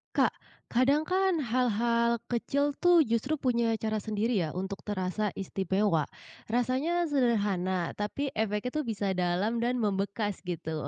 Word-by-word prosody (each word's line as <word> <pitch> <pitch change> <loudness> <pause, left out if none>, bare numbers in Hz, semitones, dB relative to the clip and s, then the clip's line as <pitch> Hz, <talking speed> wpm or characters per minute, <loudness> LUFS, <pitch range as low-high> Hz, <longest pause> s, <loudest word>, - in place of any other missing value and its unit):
Kak, - - +4 0.4
kadang 275 +5 +3
kan 370 -2 +1
hal-hal 235 -1 +1
kecil 280 +4 +1
tuh 355 -2 +6
justru 230 +5 0
punya 235 -5 +1
cara 220 -1 -2
sendiri 215 +1 0
ya 150 - -7
untuk 190 +2 -4
terasa 205 +1 -1
istimewa. 190 -4 0 0.4
Rasanya 260 +9 +1
sederhana, 205 - +1
tapi 265 +7 -2
efeknya 215 +2 -1
tuh 295 - -3
bisa 205 -3 -1
dalam 185 +5 0
dan 240 +2 +1
membekas 205 -2 -1
gitu. 160 -3 -3
225 Hz, 130 wpm, -29 LUFS, 195-255 Hz, 0.4 s, tuh